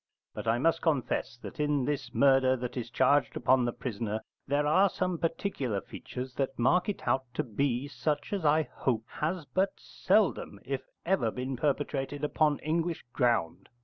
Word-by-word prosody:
But - - -6
I 115 +1 +3
must 165 +6 +2
confess 135 -6 0
that - - -8
in 145 -3 +1
this 145 0 -2
murder 135 -2 +4
that 125 -1 -5
is 120 -2 -4
charged 135 +3 +2
upon 125 0 +3
the 120 - 0
prisoner 110 -3 -3 0.3
there 145 +2 +1
are 190 +7 +5
some 180 -2 -2
particular 165 - -1
features 125 +6 -7
that 135 -1 -1
mark 175 - +3
it 205 - -4
out 130 0 +2
to - - 0
be 125 +3 -1
such 150 +3 -2
as 195 -4 -1
I 155 +1 +4
hope 115 -6 -2
has 165 +1 -2
but 190 +6 0
seldom - - +1
if - - -2 0.2
ever 135 -12 +2
been 130 +3 -4
perpetrated 145 +1 -1
upon 150 0 +2
English 165 +2 -1
ground. 95 - 0
140 Hz, 170 wpm, -30 LUFS, 125-155 Hz, 0.3 s, are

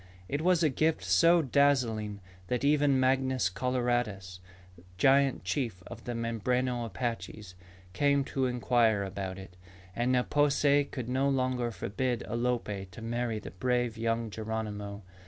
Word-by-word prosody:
It 145 +7 -2
was 175 0 +3
a 155 - +4
gift 155 +4 0
so 170 0 +4
dazzling 120 -7 +1 0.3
that 125 +4 -1
even 145 -2 +3
Mangus 130 -5 +2
Coloradus, 120 -6 -1 0.6
giant 135 +5 +3
chief 95 -1 -2
of 115 -1 -10
the 120 - -3
Mimbreno 120 +2 -1
Apaches, 110 -3 -5 0.4
came 140 +4 +2
to 135 -1 -1
inquire 120 -4 +2
about 95 -1 -5
it. 95 -2 -11 0.4
And 120 +2 +1
Ne 125 -1 +3
po 145 +2 +2
se 145 0 +3
could 130 -4 -6
no 130 +2 +1
longer 130 -2 0
forbid 120 +2 -2
Alope 115 -5 -2
to 90 - -11
marry 120 -1 -2
the - - -8
brave 120 +3 0
young 115 0 -1
Geronimo. 105 -2 -5
120 Hz, 140 wpm, -30 LUFS, 110-135 Hz, 0.6 s, a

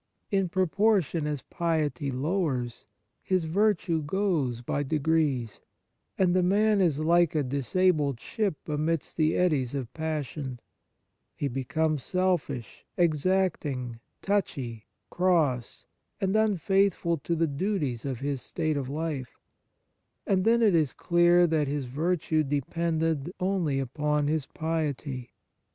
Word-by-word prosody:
In 195 -3 +1
proportion 185 -3 +1
as 145 -3 -3
piety 155 -4 -1
lowers, 135 -4 -2 0.3
his 185 -2 0
virtue 175 -1 +1
goes 150 - 0
by 140 +4 -2
degrees, 145 - 0 0.6
and 185 -2 +3
the 185 - +4
man 205 +3 +3
is 165 -6 +2
like 170 +1 +3
a 150 - +2
dis 135 0 -4
abled 155 -9 +3
ship 205 - -3
amidst 155 +1 -1
the 155 -1 +2
eddies 145 -8 +1
of 125 -3 -4
pas 155 -2 -2
sion; 130 -2 -6 0.8
he 145 - -2
becomes 145 +4 -1
selfish, 175 -9 -1
exacting, 155 -7 0 0.2
touchy, 130 - -2 0.2
cross, 160 -10 +1 0.3
and 195 +1 0
unfaithful 195 -4 +2
to 170 +4 -2
the 165 0 +2
duties 145 - -2
of 130 -3 -4
his 140 -2 -2
state 155 -3 -2
of 135 -2 -3
life; 145 -4 -4 0.9
and 185 -1 +1
then 235 +1 +4
it 210 -4 +5
is 155 -5 +2
clear 175 0 +4
that 155 -3 +1
his 140 -1 -2
virtue 155 +4 0
depended 160 +2 -1
only 180 -7 0
upon 150 +3 0
his 150 -1 0
piety. 150 -6 -3
155 Hz, 125 wpm, -28 LUFS, 140-180 Hz, 0.9 s, it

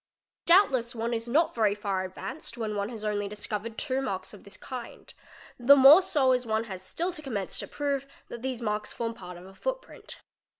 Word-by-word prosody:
| - - -66
Doubtless 270 - +4
one 230 +1 -2
is 230 0 -3
not 310 +7 +2
very 215 -3 +2
far 200 -2 -2
advanced 255 +11 -7
when 215 -2 -3
one 200 +1 -2
has 225 -3 -7
only 205 -1 -1
discovered 210 +2 -5
two 265 -3 0
marks 190 -8 -4
of 205 - -13
this 200 - -9
kind; 250 -3 -9 0.5
the 260 +4 +8
more 280 +6 +9
so 285 -8 +2
as 250 -1 +2
one 220 -1 0
has 190 -5 -7
still 335 - -2
to 340 -3 -7
commence 215 -10 -3
to - - -5
prove 280 -2 -2 0.2
that 235 - -8
these 255 -2 -4
marks 210 -1 -2
form 230 -1 -3
part 180 -6 -10
of 175 - -12
a 190 - -13
footprint. - - -6
230 Hz, 210 wpm, -28 LUFS, 210-270 Hz, 0.5 s, more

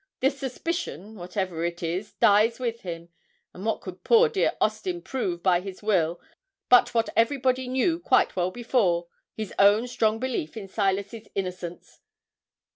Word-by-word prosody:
The 265 +2 +3
suspicion, 270 - -4
whatever 180 -3 -4
it 170 0 -3
is 180 +5 -3
dies 215 +3 +4
with 235 -2 -3
him, 170 -2 -7 0.4
and 185 - -9
what 220 +1 -1
could 185 -1 -9
poor 470 0 +5
dear 425 -4 +1
Austin 355 -2 -1
prove 180 -10 -3
by 180 -2 +4
his 190 +1 -9
will 175 -5 +1 0.5
but 245 -1 +5
what 230 0 +2
everybody 255 +1 +2
knew 265 +7 +1
quite 350 - +2
well 180 -1 +1
before 185 -6 0 0.3
his 215 -3 -5
own 205 +4 +5
strong 220 -2 +1
belief 240 -9 -3
in 200 -3 -6
Silas's 200 +2 -2
innocence? 180 -2 -5
210 Hz, 150 wpm, -26 LUFS, 180-250 Hz, 0.5 s, poor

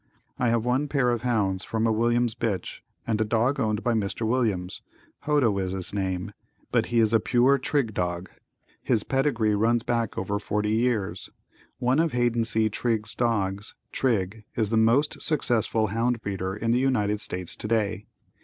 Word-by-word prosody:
I 120 - +2
have 115 0 +1
one 130 +4 +1
pair 135 -4 +1
of 120 -2 -1
hounds 105 -6 0
from 110 0 -1
a 115 - +3
Williams 120 +1 +2
bitch 115 -5 -3 0.3
and 110 -1 0
a - - +5
dog 120 +6 +1
owned 110 -3 0
by 120 - +1
Mr. 110 +1 -1
Williams 110 -7 -1 0.4
Hodo 145 -8 +3
is 95 -1 -2
his 95 0 -4
name 95 -2 -2 0.4
but - - +2
he 120 -1 +1
is 110 -1 +3
a 115 - +5
pure 125 +5 +3
Trigg 125 -4 0
dog. 90 -1 -2 0.5
His 115 -5 +1
pedigree 135 -6 +1
runs 115 +3 +2
back 115 -2 -1
over 100 +2 -1
forty 105 +1 -1
years. 110 -3 0 0.5
One 125 +4 +1
of 165 -3 +1
Haiden 120 -1 +1
C. 110 -1 +2
Trigg's 110 0 -1
dogs, 105 -4 -1 0.2
Trigg, 110 -4 -1
is 110 -2 0
the - - +2
most 115 +7 +3
successful 115 -7 +1
hound 115 +3 0
breeder 95 -1 -3
in 115 +2 -1
the 120 - +3
United 105 -6 +1
States 90 -1 -4
today. 105 -2 -1
115 Hz, 170 wpm, -26 LUFS, 105-120 Hz, 0.5 s, a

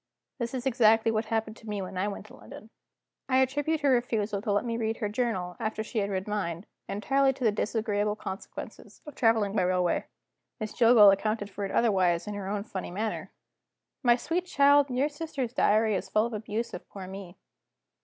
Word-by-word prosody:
This 235 +1 -3
is 250 0 -4
exactly 225 -3 +4
what 220 0 -1
happened 220 -1 -2
to 220 - -11
me 205 -1 -2
when 185 0 -6
I 185 +3 0
went 205 0 -6
to - - -14
London. 220 - -13 0.6
I 260 - +3
attribute 290 +4 +1
her 285 -2 +3
refusal 220 -5 0
to 210 -1 -2
let 205 +4 +1
me 230 -1 -2
read 225 -1 -1
her 210 -3 -2
journal, 205 -6 -2
after 220 -1 -2
she 220 0 -3
had 200 -1 -1
read 190 0 -3
mine, 190 -4 -3 0.2
entirely 270 +6 +2
to 260 - -7
the 220 - +4
disagreeable 210 -1 -1
consequences 195 -2 -8
of 300 - -9
traveling 225 -5 +2
by 200 - +3
railway. 180 -1 +1 0.5
Miss 215 -2 -4
Jillgall 230 -4 +7
accounted 205 0 -2
for 200 +1 -4
it 195 - -5
otherwise, 185 -7 +2
in 210 - -5
her 200 -2 -5
own 200 0 -2
funny 190 -4 -6
manner: 215 +4 -4 0.7
"My 240 -3 +5
sweet 345 +8 -2
child, 285 -2 +4
your 260 +3 +1
sister's 290 -5 -4
diary 215 -3 +3
is 190 - -3
full 215 +1 +2
of 235 - -5
abuse 215 +2 -4
of 180 - -8
poor 195 -2 -8
me." 190 -1 -9
215 Hz, 200 wpm, -28 LUFS, 200-240 Hz, 0.7 s, Jillgall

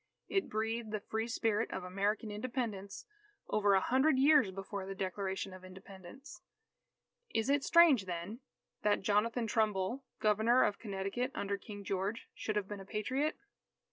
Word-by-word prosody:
It 390 -1 0
breathed 225 +1 -2
the 215 0 -2
free 220 +2 -3
spirit 225 -1 0
of 190 - -4
American 200 +4 -1
Independence 210 -3 -4 0.4
over 205 -2 +3
a - - +5
hundred 265 +7 +3
years 280 -5 +6
before 195 0 -6
the 195 - -5
Declaration 190 0 -3
of 185 0 -11
Independence. 190 +7 -12 0.9
Is 225 +4 +2
it 285 -1 +2
strange, 325 - +6
then, 180 +6 -5 0.4
that 205 -2 +2
Jonathan 225 +4 +1
Trumbull, 215 +3 0 0.2
Governor 220 +4 +4
of 205 - 0
Connecticut 200 +4 -2
under 200 0 -1
King 205 0 -9
George, 195 +3 -2
should 215 - -3
have 205 -2 -1
been 205 -1 -6
a - - -8
Patriot? 260 +10 -1
210 Hz, 150 wpm, -34 LUFS, 195-235 Hz, 0.9 s, years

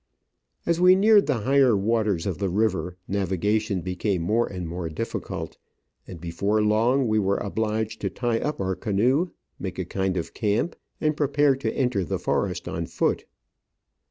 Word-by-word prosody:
As 170 0 +1
we 180 +1 +8
neared 205 +1 +5
the 130 -7 0
higher 130 -1 +4
waters 105 -4 +1
of 95 -5 -2
the 100 - 0
river, 95 -2 0
navigation 100 +1 0
became 90 0 -1
more 115 +7 +2
and 90 -3 -5
more 85 0 -4
difficult, 80 - -5 0.5
and 90 - -9
before 85 +6 0
long 115 +5 +3
we 110 0 +2
were 100 -1 +1
obliged 110 +1 -2
to - - -1
tie 120 -2 -1
up 150 - -3
our 95 -1 -1
canoe, 120 - +1 0.3
make 95 -2 -5
a 95 - -2
kind 95 +1 -1
of 85 - -4
camp, 110 +10 0 0.2
and 155 0 +1
prepare 145 -1 +3
to 135 - -2
enter 125 -7 0
the 85 - -2
forest - - -1
on - - -3
foot. - - -1
105 Hz, 165 wpm, -25 LUFS, 95-125 Hz, 0.5 s, we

